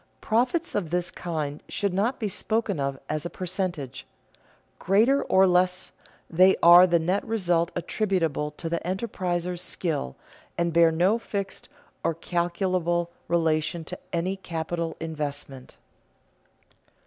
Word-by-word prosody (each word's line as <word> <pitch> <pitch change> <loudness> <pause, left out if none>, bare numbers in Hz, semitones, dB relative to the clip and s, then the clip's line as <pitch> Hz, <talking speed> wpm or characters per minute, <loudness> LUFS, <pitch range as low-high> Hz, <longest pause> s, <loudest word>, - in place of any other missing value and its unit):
Profits 250 +10 0
of 185 -6 -1
this 175 +1 -1
kind 155 -4 -4
should 200 -2 -1
not 215 +8 0
be 220 - -1
spoken 210 -2 -1
of 135 -1 -2
as 155 -1 -2
a 175 - -4
percentage. 175 -8 -4 0.7
Greater 225 +9 +3
or 190 0 +4
less, 180 0 +1 0.4
they 185 +3 +5
are 175 +2 +9
the 170 -1 +3
net 180 +4 0
result 175 -6 0
attributable 175 -6 -1
to 165 - -5
the 170 0 -1
enterpriser's 180 -2 -3
skill, 150 - -2 0.4
and 170 -1 0
bear 165 0 +5
no 185 +8 +2
fixed 200 -4 -5 0.3
or 165 -1 0
calculable 175 0 -1 0.2
relation 160 -1 +1
to - - -8
any 175 +3 -1
capital 170 -2 -4
investment. 145 -4 -5
175 Hz, 125 wpm, -26 LUFS, 165-190 Hz, 0.7 s, are